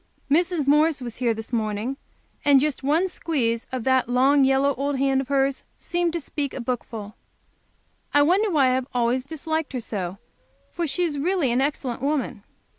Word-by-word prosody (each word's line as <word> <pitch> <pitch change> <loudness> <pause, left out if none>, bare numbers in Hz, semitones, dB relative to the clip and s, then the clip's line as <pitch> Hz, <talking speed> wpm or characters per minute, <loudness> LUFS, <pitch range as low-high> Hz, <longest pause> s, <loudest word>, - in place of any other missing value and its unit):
Mrs. 340 -1 +2
Morris 300 +2 +3
was 240 -3 -6
here 245 -2 +1
this 220 +2 -6
morning, 220 +3 -1 0.5
and 285 -2 +6
just 295 0 -1
one 310 +7 +2
squeeze 240 -11 -1
of 255 -2 -3
that 260 -1 +2
long, 270 +3 +4
yellow 270 +1 +3
old 280 +1 -2
hand 270 0 +2
of 265 - -7
hers 275 -1 +1
seemed 345 -1 -1
to 340 - -1
speak 285 -2 -4
a - - -4
bookful! 230 -4 -4 1.0
I 290 - +5
wonder 385 +8 +3
why 300 -7 +3
I 255 - +3
have 260 0 -1
always 245 +1 +1
disliked 315 0 -3
her 255 - -2
so, 195 -5 -4 0.5
for 345 -1 -2
she 355 +5 -1
is 300 -5 -1
really 335 -4 +1
an 245 +2 +2
excellent 270 -4 -2
woman. 280 -6 -1
275 Hz, 185 wpm, -24 LUFS, 250-300 Hz, 1.0 s, and